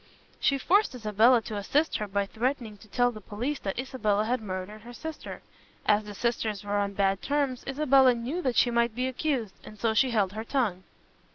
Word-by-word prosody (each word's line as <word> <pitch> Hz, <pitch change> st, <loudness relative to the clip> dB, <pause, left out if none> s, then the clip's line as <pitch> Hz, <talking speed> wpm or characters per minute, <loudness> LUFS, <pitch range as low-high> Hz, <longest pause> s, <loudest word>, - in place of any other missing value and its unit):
She 275 Hz, -, +2 dB
forced 385 Hz, +4 st, +2 dB
Isabella 225 Hz, +1 st, +4 dB
to 215 Hz, -1 st, -5 dB
assist 290 Hz, +10 st, +1 dB
her 210 Hz, -, -3 dB
by 200 Hz, 0 st, 0 dB
threatening 230 Hz, +1 st, -2 dB
to 215 Hz, -, -17 dB
tell 245 Hz, +4 st, +2 dB
the 215 Hz, -2 st, -10 dB
police 245 Hz, +9 st, -3 dB
that 195 Hz, -, -4 dB
Isabella 215 Hz, -5 st, 0 dB
had 245 Hz, +1 st, 0 dB
murdered 195 Hz, +1 st, -6 dB
her 240 Hz, +2 st, -11 dB
sister. 320 Hz, +5 st, -7 dB, 0.4 s
As 210 Hz, 0 st, +3 dB
the 205 Hz, -1 st, -8 dB
sisters 220 Hz, -3 st, -1 dB
were 205 Hz, 0 st, -1 dB
on 200 Hz, 0 st, -1 dB
bad 195 Hz, -1 st, +1 dB
terms, 280 Hz, -3 st, -1 dB
Isabella 270 Hz, -2 st, +4 dB
knew 255 Hz, +10 st, -3 dB
that 255 Hz, -7 st, -1 dB
she 240 Hz, -, +4 dB
might 235 Hz, -1 st, +1 dB
be 250 Hz, +1 st, -1 dB
accused, 260 Hz, -5 st, -2 dB
and 215 Hz, -, -12 dB
so 220 Hz, +2 st, +1 dB
she 260 Hz, +4 st, +3 dB
held 205 Hz, -5 st, +1 dB
her 220 Hz, +1 st, -4 dB
tongue." 225 Hz, -8 st, -1 dB
230 Hz, 200 wpm, -28 LUFS, 205-260 Hz, 0.4 s, Isabella